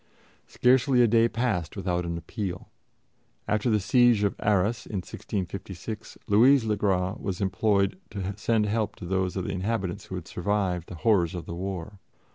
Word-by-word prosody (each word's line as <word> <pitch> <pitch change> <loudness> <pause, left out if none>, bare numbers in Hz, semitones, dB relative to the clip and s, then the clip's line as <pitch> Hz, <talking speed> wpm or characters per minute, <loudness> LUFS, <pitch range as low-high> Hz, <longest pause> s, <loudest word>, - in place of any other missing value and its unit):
Scarcely 125 0 +4
a - - +5
day 115 +1 +4
passed 110 -10 -1
without 90 -2 -1
an 85 0 -3
appeal. 90 +2 -5 0.8
After 105 +3 +1
the 105 -2 +3
siege 115 +2 +4
of 100 - +2
Arras 105 +2 +1
in 110 - -6
1656, 95 +3 -6
Louise 120 +4 +5
le 110 -1 +1
Gras 95 -1 0
was 95 -3 -3
implored 100 - +1
to 100 -1 -4
send 110 +1 +1
help 105 0 -1
to 90 - -9
those 95 0 -1
of 95 - -2
the - - -3
inhabitants 95 0 -2
who 95 - -6
had 90 -3 -6
survived 90 -2 -1
the 90 - -7
horrors 95 -7 +3
of 85 - -5
the - - -6
war. 95 +2 -5
100 Hz, 170 wpm, -27 LUFS, 90-110 Hz, 0.8 s, a